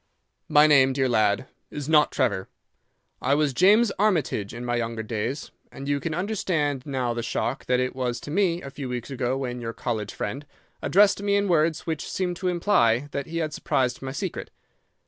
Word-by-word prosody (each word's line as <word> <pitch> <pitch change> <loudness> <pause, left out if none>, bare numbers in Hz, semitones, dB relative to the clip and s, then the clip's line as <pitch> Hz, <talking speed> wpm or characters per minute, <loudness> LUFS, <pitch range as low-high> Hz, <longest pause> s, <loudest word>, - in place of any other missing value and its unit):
"'My 150 +1 +6
name, 135 -3 +5
dear 135 0 +1
lad, 110 -2 +2 0.2
is 145 -2 -6
not 155 -1 +4
Trevor. 100 -7 0 0.7
I 135 +2 +2
was 150 -2 +1
James 205 - +5
Armitage 160 - +1
in 120 +2 -7
my 120 0 0
younger 115 -1 -3
days, 115 +6 -4 0.2
and 140 - -8
you 145 0 +1
can 160 +1 -3
understand 165 -8 -1
now 130 -4 -1
the 120 - -3
shock 120 +3 -2
that 125 0 +2
it 125 0 -1
was 125 -2 -2
to 145 - -7
me 175 -1 +1
a 135 - -7
few 135 -2 -6
weeks 125 +2 -5
ago 130 0 -1
when 125 -2 -4
your 115 -1 -4
college 110 -4 -3
friend 140 +8 -4 0.3
addressed 200 +1 +4
me 200 0 +1
in 200 0 +2
words 160 -2 +1
which 160 -3 -3
seemed 180 -2 -2
to 185 +1 -3
imply 145 - +2
that 140 -1 -4
he 165 +1 -5
had 155 -2 -2
surmised 125 -1 0
my 135 0 -4
secret. 135 - -4
140 Hz, 195 wpm, -25 LUFS, 125-165 Hz, 0.7 s, My